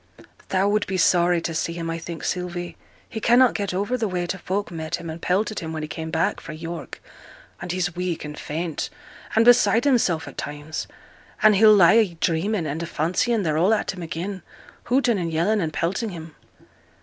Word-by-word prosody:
'Thou 190 +1 +2
would 210 +1 +1
be 190 - -2
sorry 175 0 +3
to 165 0 -4
see 165 +1 -2
him, 165 -1 -5
I 165 0 -3
think, 170 0 -7
Sylvie. 175 -1 -3 0.3
He 220 - -6
cannot 245 +2 +5
get 200 -2 -2
over 200 +7 -1
the 225 - -1
way, 180 -2 -2
t' 175 - -3
folk 195 +2 -3
met 160 -2 -3
him, 165 - -6
and 165 +1 -8
pelted 205 +4 0
him 160 -3 -5
when 155 -1 -4
he - - -4
came 160 +1 -6
back 160 +1 0
fra' 155 - -8
York, 165 +1 -7 0.6
and 175 -1 -4
he's 180 -1 -2
weak 180 -3 -3
and 150 0 -7
faint, 160 +2 -4 0.5
and 225 +1 +5
beside 240 -1 +5
himself 220 - +2
at - - -9
times; 145 +2 -5 0.6
and 215 -1 +7
he'll 215 +1 +7
lie 180 -2 +7
a 215 -6 +3
dreaming, 170 +3 0
and 155 +2 -3
a 170 - -4
fancying 195 +9 0
they're 155 -2 0
all 195 +6 +4
at - - -2
him 185 - -9
again, 175 +4 -5 0.4
hooting, 245 -4 +2
and 170 -2 -2
yelling, 185 +7 +1
and 160 -2 -1
pelting 190 +9 -1
him.' 165 -4 -9
175 Hz, 205 wpm, -23 LUFS, 165-205 Hz, 0.6 s, and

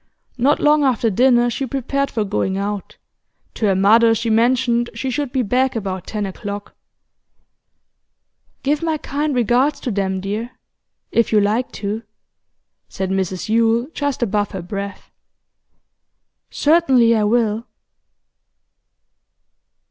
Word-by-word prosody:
Not 275 +5 +3
long 300 0 +4
after 240 -4 +1
dinner 240 +2 +3
she 270 +3 -3
prepared 275 +2 -2
for 220 - -1
going 190 -1 -1
out; 200 0 -4 0.6
to 215 - -1
her 195 - +2
mother 225 +4 +5
she 230 +1 -1
mentioned 240 +1 +2
she 265 - -3
should 285 0 -2
be 260 -2 0
back 250 +4 +1
about 190 -4 -4
ten 210 -2 -3
o'clock. 200 +1 -6 1.9
'Give 290 +2 +1
my 325 -2 0
kind 290 0 -2
regards 250 +5 +2
to 250 - -3
them, 190 -2 -1
dear 210 +6 -5 0.5
if 230 - +2
you 215 - +5
like 215 +5 0
to,' 210 +2 -4 0.9
said 190 -1 -3
Mrs 190 0 -2
Yule 230 +3 +2
just 285 -4 -2
above 205 -2 0
her 190 -3 -5
breath. 200 +2 -6 1.4
'Certainly 265 -7 +3
I 215 - +1
will. 220 0 +1
230 Hz, 125 wpm, -19 LUFS, 205-260 Hz, 1.9 s, mother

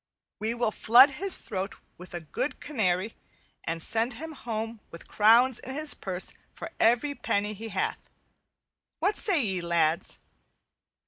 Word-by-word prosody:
We 220 +3 -1
will 235 -2 0
flood 250 +7 +6
his 375 +7 +2
throat 195 -2 -5 0.2
with 175 -3 -9
good 290 - -2
canary 210 -7 -1 0.5
and 165 0 -2
send 225 +2 0
him 320 +6 -7
home 225 -5 -5
with 170 - -12
crowns 230 +4 +4
in 260 +2 -7
his 305 0 +2
purse 185 -1 -4 0.2
for - - -8
every 245 +6 +3
penny 210 -5 -1
he 220 +2 -8
hath. 195 - -3 0.9
What 415 - +1
say 345 - +3
ye, 190 -3 -2
lads?" 170 -1 0
225 Hz, 140 wpm, -27 LUFS, 190-260 Hz, 0.9 s, flood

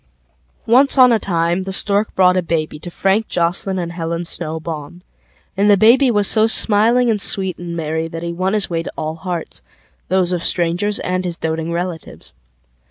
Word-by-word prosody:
Once 265 +5 +4
on 255 -1 +6
a 225 - +2
time 170 -1 -1
the 190 +1 -6
Stork 200 +2 0
brought 180 -1 +3
a 185 - +1
babyTo 160 -1 -4
Frank 195 +5 0
Joslyn 180 +3 -1
and 170 -2 -4
Helen 170 0 -5
Snow 160 -1 -6
Baum, 160 +2 -8 0.5
And 200 +2 +1
the 205 - +5
baby 240 +6 +4
was 205 -4 +3
so 220 0 +4
smiling 225 +3 +4
and 210 -2 -2
sweet 190 -2 +2
and 170 -1 -7
merryThat 160 +1 -4
he 170 0 -4
won 185 +3 -2
his 210 -2 +2
way 165 -1 -3
to - - -8
all 155 0 -4
hearts 175 -1 -6 0.5
Those 185 -1 0
of 175 -2 -3
strangers 180 +4 -1
and 185 0 -2
his 175 -2 -4
doting 160 +1 -4
relatives. 170 -1 -6
180 Hz, 180 wpm, -17 LUFS, 165-205 Hz, 0.5 s, on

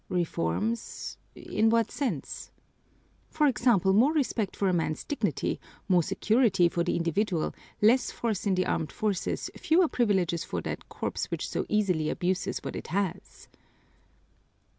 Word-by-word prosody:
"Reforms? 175 - -2 0.2
In 220 +1 +1
what 230 -1 +2
sense?" 230 - -3 0.8
"For 305 -1 +2
example, 235 - +3
more 250 +10 +5
respect 245 -9 0
for 200 - 0
a 185 - +2
man's 160 -2 -1
dignity, 290 - -1 0.3
more 180 -2 +4
security 210 0 +3
for 170 0 0
the 175 - 0
individual, 170 +1 0 0.3
less 245 +4 +5
force 220 -4 -2
in 195 - +3
the 185 - +1
armed 155 - -1
forces, 205 -4 -2
fewer 340 +2 +3
privileges 190 - +1
for - - -3
that - - -6
corps - - -3
which - - -3
so - - -3
easily 180 -8 +1
abuses 185 +1 -1
what - - -5
it - - -6
has." 190 0 -3
200 Hz, 140 wpm, -28 LUFS, 175-230 Hz, 0.8 s, more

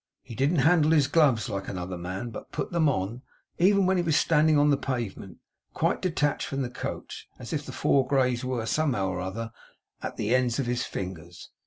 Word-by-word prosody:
He - - -10
didn't 135 +8 +1
handle 160 -2 +5
his 150 -4 +4
gloves 145 - +3
like 100 -1 -4
another 90 0 -4
man, 95 +7 -5
but - - -9
put - - -4
them 165 -3 +3
on 115 0 -2 0.4
even 195 +2 +4
when 190 +1 +2
he - - +2
was 160 -3 +2
standing 155 -1 +4
on 145 0 +4
the - - +5
pavement, 120 -9 -4 0.4
quite - - 0
detached 150 -5 0
from 135 0 -2
the 125 - -4
coach 125 - -6
as - - -7
if - - -1
the - - -5
four 135 -2 +2
greys 130 -3 +1
were, 125 -3 -2
somehow 120 -7 0
or 95 -1 -3
other, 115 +5 -5 0.5
at - - -5
the 105 +3 0
ends 125 -2 +2
of 135 - -1
the 120 - 0
fingers. 90 -7 -6
125 Hz, 205 wpm, -27 LUFS, 100-150 Hz, 0.5 s, handle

